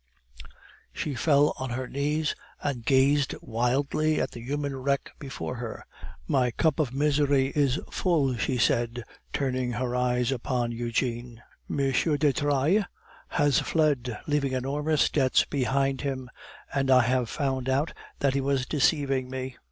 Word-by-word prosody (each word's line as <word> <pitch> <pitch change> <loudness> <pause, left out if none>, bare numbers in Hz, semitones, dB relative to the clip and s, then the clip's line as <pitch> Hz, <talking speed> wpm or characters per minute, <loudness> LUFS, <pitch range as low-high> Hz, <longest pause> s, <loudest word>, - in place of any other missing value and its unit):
She 150 - -3
fell 145 +3 +3
on 130 0 -3
her 125 +2 -3
knees, 150 +3 -1 0.3
and 135 -5 -2
gazed 135 +2 +3
wildly 140 +7 0
at - - -1
the 120 - -9
human 140 +2 -3
wreck 140 +1 -1
before 135 -2 -5
her. 115 -2 -6 0.4
"My 130 -4 +2
cup 160 +5 +1
of 145 -6 +1
misery 140 -1 +2
is 140 -2 +2
full," 150 -8 +1
she 125 +3 0
said, 120 0 +1 0.3
turning 130 -3 -1
her 125 +2 -2
eyes 125 0 +1
upon 125 -1 -1
Eugene. 120 0 -3 0.3
"M. - - -2 0.2
de 150 -2 +2
Trailles 145 +8 +2 0.4
has 145 -2 +2
fled, 140 -8 0
leaving 145 -3 0
enormous 145 +4 +1
debts 130 -3 +2
behind 135 0 0
him, 130 -3 -4 0.4
and 135 -1 0
I 130 -1 +7
have 125 -1 +1
found 130 -3 -2
out 140 +5 +1 0.3
that 140 -2 +2
he 140 - +1
was 135 -1 0
deceiving 135 -3 +1
me. 130 -1 -5
135 Hz, 145 wpm, -27 LUFS, 125-145 Hz, 0.4 s, I